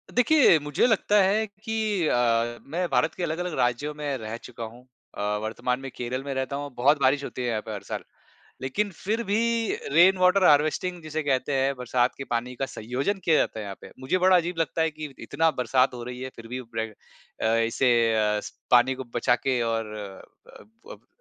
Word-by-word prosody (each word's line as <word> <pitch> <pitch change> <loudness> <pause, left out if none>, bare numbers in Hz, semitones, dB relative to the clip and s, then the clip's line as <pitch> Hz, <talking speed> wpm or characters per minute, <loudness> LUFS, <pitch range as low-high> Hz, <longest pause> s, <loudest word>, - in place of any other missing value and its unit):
देखिए 250 - +6
मुझे 145 +6 +1
लगता 210 -2 +3
है 210 +3 +2
कि 215 -2 -2
अ, 120 -1 +1
मैं 175 +5 -3
भारत 160 0 +2
के 180 - -4
अलग-अलग 175 +1 -2
राज्यों 125 +5 0
में 145 -2 -3
रह 110 0 -6
चुका 120 -1 -9
हूँ, 115 +2 -9 0.4
अ, - - -3 0.2
वर्तमान 125 +3 -2
में 135 0 -7
केरल 125 +2 -4
में 140 - -4
रहता 130 +1 -2
हूँ 145 0 -5
बहुत 140 +4 +3
बारिश 140 +2 +3
होती 125 - -6
है 125 - -1
यहाँ 110 -2 -1
पे 110 - -6
हर 100 - -6
साल। - - -5 0.6
लेकिन 200 +11 -1
फिर 215 +7 -2
भी 205 +1 +1 0.5
रेन 180 +5 +6
वाटर 185 +1 +4
हार्वेस्टिंग 155 +4 +3
जिसे 155 0 -3
कहते 135 -1 0
हैं 135 0 +1
बरसात 125 0 0
के 135 - -6
पानी 125 +2 -2
का 135 - -2
सँयोजन 130 - -3
किया 160 -2 +4
जाता - - 0
है 110 - -4
यहाँ 100 -1 -7
पे। - - -12
मुझे 135 +8 0
बड़ा 185 0 +5
अजीब 175 0 -1
लगता 165 0 0
है 160 - +1
कि 150 -2 -8
इतना 165 0 +1
बरसात 125 +1 +2
हो 120 - -7
रही 125 0 -7
है 130 - -5
फिर 115 - -10
भी 125 +1 -4
ब्रे 115 -1 -4 0.6
अ, 110 +1 +3
इसे 115 +3 +2 0.2
अ, 105 -1 +1
स - - -8 0.2
पानी 125 +2 +5
को 130 0 -7
बचा 120 0 +3
के 130 0 -1
और 115 -2 -2
अ, 100 -2 -11 0.3
अब - - -15
135 Hz, 210 wpm, -26 LUFS, 120-170 Hz, 0.6 s, देखिए